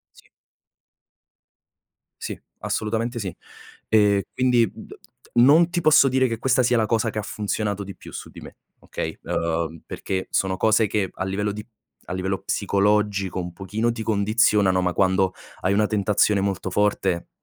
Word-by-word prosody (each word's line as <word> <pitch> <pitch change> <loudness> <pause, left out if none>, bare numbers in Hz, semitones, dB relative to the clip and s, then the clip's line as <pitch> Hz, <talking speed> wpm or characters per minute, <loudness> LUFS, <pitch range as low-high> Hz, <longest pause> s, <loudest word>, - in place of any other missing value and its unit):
Sì. - - -20 1.9
Sì, - - -5 0.2
assolutamente 115 +2 -2
sì, 95 -5 -5 0.5
ehm, 105 -2 +4
quindi 125 -4 +3
d - - -11 0.4
non 155 +8 +6
ti 175 -1 -1
posso 155 -3 +6
dire 130 0 +2
che 115 -2 -3
questa 130 +1 +2
sia 120 0 +2
la 110 - +2
cosa 115 0 0
che 110 - -7
ha 105 - -1
funzionato 105 -1 -3
di 100 0 -9
più - - -13
su - - -8
di - - -12
me, - - -12 0.2
okay, 80 - -5
ehm, 85 -1 -2
perché 95 -1 -4
sono 95 -1 0
cose 110 +1 +3
che 95 -2 -1
a - - -5
livello 105 +2 -2
di 105 +1 -7 0.4
a - - -4
livello 95 +1 -2
psicologico 100 -1 0
un 90 -1 -5
pochino 105 +5 -2
ti 115 -1 -5
condizionano, 105 -3 +2
ma 90 -1 0
quando 95 0 +2 0.3
hai 95 - +1
una 105 +1 +2
tentazione 105 -1 +2
molto 95 -2 -2
forte, 95 -3 0
105 Hz, 160 wpm, -23 LUFS, 95-110 Hz, 1.9 s, non